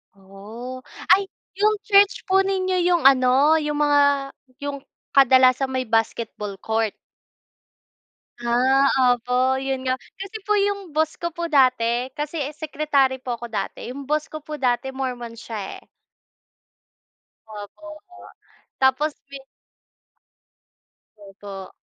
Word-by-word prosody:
Oh, 215 +7 -10 0.3
ay 395 - -1 0.3
yung 420 +1 +2
church 400 0 +4
po 385 0 +4
ninyo 375 -1 -1
yung 350 -3 +2
ano, 270 +3 +4
yung 300 -1 -1
mga 290 -1 +4 0.6
yung 285 -1 -5 0.3
kadalasan 260 0 +5
may 255 -2 -2
basketball 215 -3 -2
court? 220 0 0 1.5
Ah, 260 +3 +3 0.2
opo 250 +2 0
'yun 265 -1 -3
nga, 255 - +1 0.2
kasi 395 +3 -7
po 420 - +1
yung 400 -2 -1
boss 315 0 +1
ko 340 0 -2
po 340 +1 -5
dati 255 -4 +2
kasi 300 +2 -3
eh 280 - -2
secretary 285 -4 0
po 245 -2 -4
ako 235 - -8
dati 205 +3 -4
yung 275 -1 -9
boss 305 0 0
ko 310 - -7
po 300 +1 -7
dati 255 0 0
Mormon 250 -3 -5
siya 215 -4 -7
eh. - - -17 1.7
Opo 215 +9 -10 0.2
nga, 360 -1 -15 0.5
tapos 265 +4 +2
pi 275 0 -9 1.8
Opo. 195 -1 -10
265 Hz, 125 wpm, -22 LUFS, 240-310 Hz, 1.8 s, kadalasan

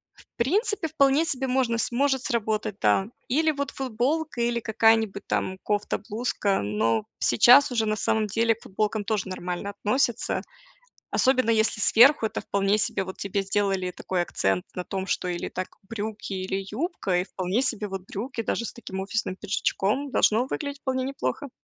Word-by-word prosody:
В - - -19
принципе, 395 - +1
вполне 285 0 +3
себе 265 -5 -1
можно 250 -3 +1
сможет 265 +2 +1
сработать, 215 -3 -1
да. 110 - +3 0.2
Или 315 +5 +3
вот 280 -2 -3
футболка, 265 +3 -1
или 235 0 +1
какая-нибудь 220 -2 +2
там 190 0 -1
кофта, 205 -1 0
блузка, 210 - 0
но 110 +2 0
сейчас 245 - +6
уже, 225 -3 +1
на 215 - +1
самом 215 +1 +1
деле, 225 +3 +2
к 225 - -18
футболкам 210 +1 -2
тоже 210 -3 -1
нормально 185 +1 -4
относятся, 240 +3 0 0.7
особенно 255 -3 +3
если 220 -1 +2
сверху 240 +5 +6
это 220 - -3
вполне 200 +1 +1
себе 200 -1 0
вот 190 0 -8
тебе 200 0 -2
сделали 195 -2 0
такой 180 -1 -2
акцент 95 - -1
на 180 - -4
том, 190 0 -4
что 185 - -1
или 175 -1 -3
так 185 0 -4 0.2
брюки, 215 -2 -5
или 190 +1 -3
юбка, 215 - -1
и - - -2
вполне 185 +5 -1
себе 220 -5 -1
вот 195 -1 -5
брюки 230 +3 -4
даже 235 +1 -2
с - - -6
таким 190 -5 -7
офисным 195 -1 -2
пиджачком- 205 +6 -1
должно 235 +4 +3
выглядеть 285 0 -4
вполне 260 -1 -1
неплохо. 270 - -3
220 Hz, 165 wpm, -26 LUFS, 195-255 Hz, 0.7 s, сейчас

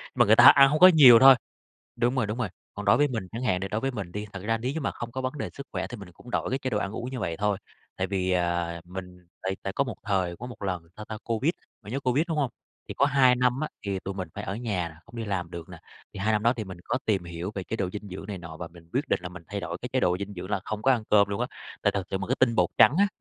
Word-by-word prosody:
mà 120 - +5
người 110 +1 +6
ta 120 - +7
ăn 140 0 +9
hông 150 +2 +1
có 185 - +11
nhiều 140 -10 +9
thôi. 135 +1 +9 0.6
Đúng 120 +2 +1
rồi, 130 -5 +1
đúng 105 +3 -4
rồi, 115 -5 -1 0.3
còn 105 - -6
đối 100 - +5
với 145 0 +3
mình 110 -8 -4
chẳng 115 - -5
hạn, 95 -8 +1
đ - - -3
đối 105 - -1
với 135 +2 -1
mình 100 -8 -6
đi, 105 +2 -4
thật 100 - -7
ra 115 +1 +1
nếu 125 +4 -2
như 160 - -3
mà 135 - -1
không 120 -1 -7
có 130 - -3
vấn 130 0 -2
đề - - -4
sức 140 - -9
khỏe - - -2
thì 120 - -8
mình 100 -4 -11
cũng 120 - -14
đổi - - -1
cái 130 - 0
chế 130 -1 -3
độ 105 - 0
ăn 100 -1 -3
uống 120 +3 -5
như 130 - -5
vậy 85 -3 -2
thôi, 105 0 0 0.4
tại 95 - -1
vì, 95 -1 -1
à, 85 -1 0
mình 90 0 -9 0.2
tại 95 0 -2
tại 95 - -3
có 140 - +1
một 120 -7 -6
thời 95 -4 0
có 120 - -7
một 125 -4 -10
lần, 90 -3 -2
sao 105 - -7
ta, 110 - -6
Covid, 115 +7 +1 0.3
bạn 105 - -9
nhớ 135 - -1
Covid, 135 +4 +1
đúng 160 - -1
hông? 135 -4 +1 0.4
Thì - - -5
có 140 - +3
2 135 -3 +5
năm 125 +1 +1
á, 155 - -1 0.2
thì 100 -1 -1
tụi 95 +1 -6
mình 95 -3 -5
phải - - -5
ở 95 - -4
nhà 105 -8 -2
nè, 80 - -14
không 115 - -13
đi 115 - -3
làm 95 -5 -3
được 85 -2 -8
nè, - - -10 0.3
thì - - -9
2 110 +2 +1
năm 105 -1 +1
đó 115 +2 +4
thì 110 - -3
mình 95 -2 -9
có - - -1
tìm 100 -5 0
hiểu 85 +2 -5
về 95 - -3
chế 110 - -4
độ 95 -4 -2
dinh 105 +1 -7
dưỡng 95 +1 -8
này 100 -3 -5
nọ 85 -2 -9
và 85 - -7
mình 85 0 -17
quyết 135 +2 -1
định - - +1
là 90 - -5
mình 90 -1 -11
thay 100 0 -4
đổi 85 -1 -5
cái 125 - -4
chế 130 - +2
độ 90 -6 +2
dinh 100 +1 -6
dưỡng 90 +1 -7
là 100 - 0
không 110 0 -4
có 135 - +4
ăn 120 -4 +2
cơm 100 -1 +5
luôn 100 0 -3
á, - - +1 0.4
tại - - +4
thực 95 -3 -3
sự 95 - -1
mà 95 - -4
cái 130 - 0
tinh 120 -3 +4
bột 90 -5 +3
trắng 140 - +7
á, 200 - +5
105 Hz, 330 wpm, -27 LUFS, 95-125 Hz, 0.6 s, có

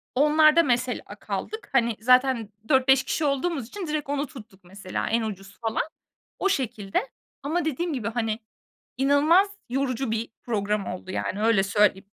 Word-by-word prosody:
onlarda 305 +3 +5
mesela 250 -2 0 0.2
kaldık. 435 -2 -5
Hani, 235 -4 +2
zaten 250 -2 +3 0.2
4-5 265 -1 +5
kişi 320 - -1
olduğumuz 280 -2 -1
için 370 - -6
direkt 300 -2 -3
onu 285 0 -1
tuttuk 215 -8 -13
mesela 185 +1 -5
en 230 +2 +2
ucuz 195 -3 -6
falan, 225 -1 0 0.6
o 390 - +1
şekilde. 235 - -1 0.3
Ama 315 +5 -1
dediğim 320 +3 -1
gibi, 240 -6 -2
hani, 225 -2 -1 0.6
inanılmaz 290 +8 +4 0.2
yorucu 260 -2 -1
bir 225 +1 -2
program 210 -3 -1
oldu, 180 +1 -6
yani, 195 +2 -3
öyle 225 -4 +4
söyleyeyim. 200 -1 +2
250 Hz, 150 wpm, -25 LUFS, 215-290 Hz, 0.6 s, onlarda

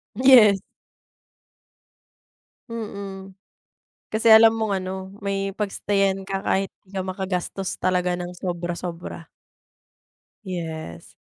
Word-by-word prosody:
Yes. 235 -5 +7 2.1
Mhm, 200 -4 -7 0.8
kasi, 220 +1 +2
alam 225 0 +9
mong 220 -3 -1
ano, 185 - -4 0.3
may 195 0 -2
pag-stay-an 195 -1 0
ka, 195 0 -3
kahit 195 0 +1 0.2
'di 190 - -22
ka 190 - -2
makagastos 185 0 -3
talaga 180 -1 +1
ng 175 0 -5
sobra-sobra. 175 -1 -5 1.2
Yes. 160 - -6
195 Hz, 90 wpm, -23 LUFS, 180-200 Hz, 2.1 s, alam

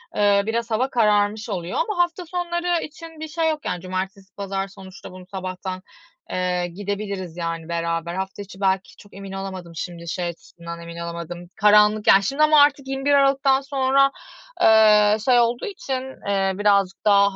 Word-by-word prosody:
Eee, 200 -1 +3
biraz 230 +1 -2
hava 250 +5 +1
kararmış 210 -2 +1
oluyor 180 -3 -3
ama 425 -8 +2
hafta 350 +1 -5
sonları 345 0 -1
için 325 +1 -10
bir 315 - -5
şey 320 +1 0
yok. 305 -1 -3
Yani, 180 -1 -3
cumartesi, 190 +1 -5
pazar 195 -1 -3
sonuçta 190 -2 -12
bunu 185 0 -12
sabahtan, 185 0 -5 0.5
eee, 180 -1 -1
gidebiliriz 200 -2 -5
yani 165 -1 -4
beraber. 170 0 -2
Hafta 190 +1 -4
içi 200 0 -11
belki 190 0 0
çok 205 - -17
emin 195 0 -8
olamadım 190 -3 -6
şimdi 170 +1 -6
şey 175 +2 -3
açısından 170 0 -9
emin 170 0 -9
olamadım. 170 +1 -7
Karanlık, 210 0 +4
yani, 195 +1 +7
şimdi 275 +8 +1
ama 305 -1 +6
artık 285 -2 +3
21 270 +1 0
Aralık'tan 275 -1 +3
sonra, 275 0 +2 0.5
eee, 215 -1 +6
şey 250 -2 +5
olduğu 240 0 +1
için, 265 - -6
eee, 195 -1 +1
birazcık 200 -2 +2
daha 200 -1 +4
200 Hz, 165 wpm, -22 LUFS, 185-265 Hz, 0.5 s, yani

